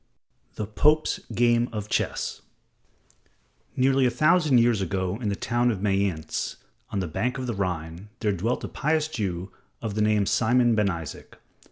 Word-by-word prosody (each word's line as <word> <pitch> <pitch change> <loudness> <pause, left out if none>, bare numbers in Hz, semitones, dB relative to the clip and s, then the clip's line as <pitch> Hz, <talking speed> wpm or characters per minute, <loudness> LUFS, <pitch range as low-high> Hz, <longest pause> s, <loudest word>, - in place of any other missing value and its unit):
The 105 - -3
Pope's 150 +9 +2 0.2
Game 120 +1 +3
of 105 -2 -4
Chess - - -2 1.3
Nearly 135 0 +3
a - - +3
thousand 155 +2 +3
years 115 -3 +3
ago 95 +2 -2
in 110 - -1
the 100 - -1
town 120 +4 +1
of 110 -5 -1
Mayence, 95 -6 -1 0.3
on 100 - -2
the 90 - -2
bank 125 - -2
of 130 - -4
the 120 - -2
Rhine, 90 -1 -4
there 105 -3 +1
dwelt 105 +6 -1
a - - -3
pious 155 +1 0
Jew 95 - -4 0.3
of 110 -3 -4
the 105 - -1
name 105 -1 +3
of - - -1
Simon 120 +1 +3
ben 105 -2 +2
Isaac. 85 -5 -7
110 Hz, 170 wpm, -26 LUFS, 95-125 Hz, 1.3 s, Game